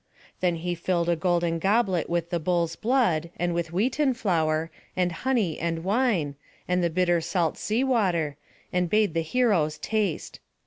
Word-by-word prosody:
Then 180 -2 +1
he 175 +2 -3
filled 170 0 0
a 170 - +3
golden 170 -1 0
goblet 195 -3 +1
with 170 0 -1
the 170 - 0
bull's 170 0 0
blood, 215 - +1
and 175 0 0
with 170 -1 -2
wheaten 255 - +1
flour, 165 -7 0 0.3
and 180 -1 +2
honey, 215 -3 0
and 165 0 -2
wine, 200 - +1 0.3
and 180 0 +1
the 170 - +2
bitter 175 0 +2
salt 170 -1 0
sea 225 +5 0
water, 180 - +1 0.4
and 180 -1 +1
bade 210 -3 +2
the 165 - +1
heroes 165 -6 +1
taste. 205 0 -2
175 Hz, 165 wpm, -26 LUFS, 165-210 Hz, 0.4 s, a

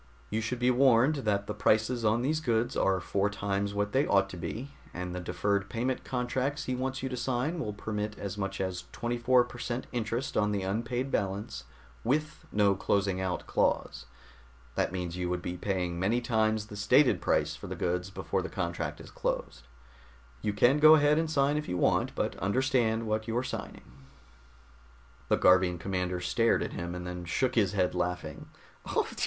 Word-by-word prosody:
"You 110 +1 0
should 115 +3 -2
be 125 +1 +3
warned 130 +3 +4
that 100 -1 +1
the 105 - -4
prices 110 +3 +2
on 110 +2 +2
these 155 +4 +1
goods 120 -3 0
are 95 -1 +2
four 100 +2 0
times 100 0 -2
what 105 0 0
they 135 +2 +2
ought 100 -1 +3
to - - -7
be, 115 - -5 0.2
and 90 0 -4
the 90 - -3
deferred 100 +3 -1
payment 125 +2 -2
contracts 130 +3 -1
he 130 - -2
wants 130 +1 -3
you 130 - -1
to 125 - -3
sign 130 +7 -1
will 110 -9 -2
permit 105 0 -4
as 100 -1 -5
much 100 -1 -3
as 95 -2 -3
24 120 +1 +2
per 120 0 -10
cent 120 +1 -3
interest 120 +2 -2
on 105 0 +2
the 100 -2 -1
unpaid 115 +7 -2
balance, 95 - -2 0.4
with 155 +5 -1
no 100 -1 +4
closing 95 0 0
out 95 -1 -2
clause. - - 0 0.7
That - - 0
means 90 -2 -4
you 90 -1 -2
would 90 0 -2
be 90 - -3
paying 90 -2 -2
many 105 +7 +2
times 110 -3 +1
the 105 - -10
stated 125 +7 +4
price - - +1
for - - -9
the - - -5
goods 90 +2 -1
before - - -2
the - - -5
contract - - -3
is - - -11
closed. - - -3 0.7
You 105 - 0
can 120 +8 +4
go 155 +1 +9
ahead 150 0 +4
and 165 -1 -1
sign 145 -1 +2
if 150 - -4
you 90 - -1
want - - +2
but - - -1
understand 115 +1 +1
what 110 0 -1
you're 120 +2 0
signing." - - -6 1.5
The - - +4
Garvian 90 -1 +4
commander 90 0 -2
stared 115 +7 +2
at - - -5
him, 85 0 -4
and 90 0 -6
then 90 0 -5
shook 130 +9 0
his 105 -4 +2
head, 90 -3 +1
laughing. 90 0 -3
105 Hz, 185 wpm, -30 LUFS, 95-125 Hz, 1.5 s, go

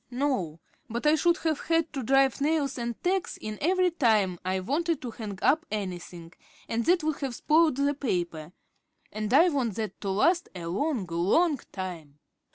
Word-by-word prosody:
"No, 245 - -1 0.3
but 235 +5 -4
I 300 - +6
should 345 +2 +3
have 315 -3 +1
had 330 -1 +1
to 275 - -3
drive 270 +2 +3
nails 290 -2 +1
and 235 -1 -4
tacks 370 +1 0
in 215 -1 -6
every 365 +2 +2
time 215 - +2
I 185 +1 -1
wanted 300 - -1
to 245 - -4
hang 215 -3 -7
up 315 +3 +3
anything, 180 -4 -6 0.3
and 230 +1 -1
that 350 -1 +3
would 310 -1 -1
have 270 -4 -3
spoiled 310 0 +3
the 280 +1 +2
paper. 175 - -3 0.6
And 215 0 -4
I 320 +7 +6
want 255 - -1
that 220 -2 -5
to 200 - -3
last 335 - +2
a 175 -2 -6
long, 225 - -1
long 200 - +2
time." 170 -7 -7
250 Hz, 175 wpm, -27 LUFS, 190-310 Hz, 0.6 s, I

